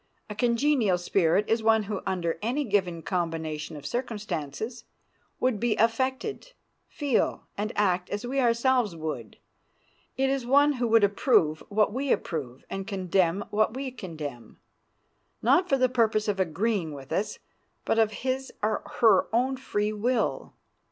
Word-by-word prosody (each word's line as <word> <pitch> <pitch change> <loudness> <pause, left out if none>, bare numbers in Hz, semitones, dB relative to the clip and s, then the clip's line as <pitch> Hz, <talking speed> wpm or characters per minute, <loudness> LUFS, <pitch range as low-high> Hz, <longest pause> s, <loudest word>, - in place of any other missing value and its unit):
A - - -5
congenial 235 -3 +2
spirit 180 +2 +2
is 225 0 +1
one 220 0 +4
who, 205 -1 -4
under 170 -3 -1
any 250 +7 0
given 190 - 0
combination 160 -4 -3
of 145 - -11
circumstances, 215 - -4 0.6
would 250 -5 +1
be 235 -1 +1
affected, 260 - -1 0.3
feel, 285 -5 0
and 210 +2 -2
act 185 -3 +1
as 205 +4 -3
we 270 +3 -1
ourselves 240 -4 +2
would; 150 -9 -5 0.8
it 270 +1 +2
is 270 -1 0
one 285 +4 +4
who 245 -3 -1
would 225 -1 +5
approve 195 - +3
what 210 0 +2
we 270 +2 -1
approve 135 -6 -3
and 195 0 -5
condemn 190 -2 +1
what 215 +2 +1
we 265 0 -4
condemn, 155 - -8 0.9
not 360 +1 +4
for 275 - +3
the 255 -1 +4
purpose 225 -4 +1
of 200 -2 -1
agreeing 185 -1 0
with 135 -1 -11
us, 205 - -1 0.5
but 225 - +2
of 220 -1 +3
his 265 +1 -1
or 215 +1 +1 0.2
her 220 -5 +6
own 255 +4 +1
free 215 -5 -2
will. 230 +2 -1
215 Hz, 150 wpm, -27 LUFS, 180-250 Hz, 0.9 s, her